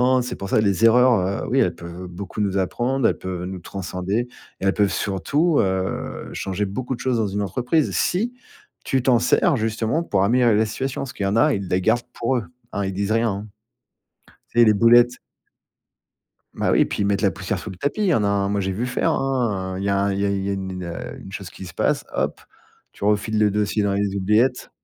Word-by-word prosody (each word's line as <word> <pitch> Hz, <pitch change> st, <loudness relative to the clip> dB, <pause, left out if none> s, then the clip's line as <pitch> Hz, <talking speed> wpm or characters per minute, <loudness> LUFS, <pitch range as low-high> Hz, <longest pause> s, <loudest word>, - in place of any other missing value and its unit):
non, 130 Hz, -, +3 dB
c'est 125 Hz, -, -4 dB
pour 100 Hz, -, -6 dB
ça -, -, +3 dB
les 100 Hz, 0 st, +1 dB
erreurs, 115 Hz, -5 st, +4 dB
heu, -, -, -6 dB
oui, 130 Hz, +4 st, +2 dB
elles 90 Hz, -9 st, +2 dB
peuvent 85 Hz, +2 st, -8 dB
beaucoup 95 Hz, +4 st, -6 dB
nous 100 Hz, -1 st, 0 dB
apprendre, 120 Hz, +7 st, +1 dB
elles -, -, 0 dB
peuvent 90 Hz, -1 st, -5 dB
nous 95 Hz, 0 st, -6 dB
transcender 95 Hz, +3 st, -3 dB, 0.4 s
et -, -, -3 dB
elles 95 Hz, -, +3 dB
peuvent 100 Hz, -2 st, +2 dB
surtout, 145 Hz, -, +1 dB
heu, 95 Hz, -1 st, -2 dB
changer 95 Hz, +2 st, -2 dB
beaucoup 125 Hz, +7 st, -4 dB
de -, -, -16 dB
choses 130 Hz, -2 st, 0 dB
dans 110 Hz, -2 st, +1 dB
une 100 Hz, +1 st, -2 dB
entreprise. 125 Hz, -, 0 dB
Si 225 Hz, +7 st, 0 dB, 0.5 s
tu 135 Hz, -, 0 dB
t'en 125 Hz, -1 st, +4 dB
sers 145 Hz, +7 st, +3 dB
justement 115 Hz, +6 st, -1 dB
pour 100 Hz, -, +1 dB
améliorer 120 Hz, +1 st, +4 dB
la 110 Hz, +1 st, +3 dB
situation, 130 Hz, +4 st, -3 dB
parce 135 Hz, -3 st, -5 dB
qu'il 100 Hz, -, -4 dB
y 100 Hz, -, +1 dB
en 100 Hz, -, 0 dB
a, 150 Hz, +3 st, +4 dB
ils 100 Hz, -4 st, -3 dB
les 90 Hz, +1 st, +1 dB
gardent 120 Hz, +5 st, +2 dB
pour 125 Hz, +2 st, 0 dB
eux, 120 Hz, -, -2 dB, 0.3 s
hein. 100 Hz, -1 st, -1 dB
Ils 95 Hz, -, -3 dB
disent 100 Hz, +2 st, -2 dB
rien, 115 Hz, -1 st, +2 dB
hein. 100 Hz, +2 st, -5 dB, 1.1 s
Tu 120 Hz, -, +1 dB
sais, 120 Hz, -, +8 dB
les 110 Hz, -, +5 dB
boulettes. 120 Hz, +3 st, +5 dB, 1.4 s
Bah -, -, 0 dB
oui, -, -, +4 dB
puis, -, -, -3 dB
ils -, -, +2 dB
mettent 100 Hz, 0 st, +1 dB
la 100 Hz, -3 st, +3 dB
poussière 95 Hz, 0 st, -3 dB
sous 105 Hz, -, -7 dB
le 95 Hz, -, -8 dB
tapis. 145 Hz, -, -2 dB
Il -, -, +2 dB
y 175 Hz, -, +3 dB
en 110 Hz, -, +2 dB
a 100 Hz, -, +2 dB
un, 100 Hz, -1 st, +1 dB
moi, 100 Hz, 0 st, 0 dB
j'ai 95 Hz, 0 st, -1 dB
vu 110 Hz, +6 st, -2 dB
faire, 125 Hz, -, 0 dB
hein, 110 Hz, -9 st, -1 dB
heu, -, -, -4 dB
il -, -, -4 dB
y 100 Hz, -, 0 dB
a 100 Hz, 0 st, +2 dB
un 100 Hz, 0 st, +1 dB
il 95 Hz, -, -2 dB
y 100 Hz, -, +1 dB
a -, -, +1 dB
il 100 Hz, -1 st, -1 dB
y -, -, -1 dB
a -, -, 0 dB
une 95 Hz, -1 st, -4 dB
une, 90 Hz, -1 st, -6 dB
heu, 85 Hz, 0 st, -6 dB
une 95 Hz, -, -11 dB
chose 100 Hz, -3 st, -7 dB
qui 95 Hz, -, -10 dB
se 85 Hz, -, -10 dB
passe, -, -, 0 dB
hop. -, -, -1 dB, 0.5 s
Tu -, -, -10 dB
refiles 105 Hz, +1 st, +1 dB
le 105 Hz, -1 st, +4 dB
dossier 105 Hz, +1 st, 0 dB
dans 100 Hz, -1 st, +1 dB
les 100 Hz, 0 st, -1 dB
oubliettes. 105 Hz, +6 st, +1 dB
100 Hz, 250 wpm, -22 LUFS, 95-120 Hz, 1.4 s, sais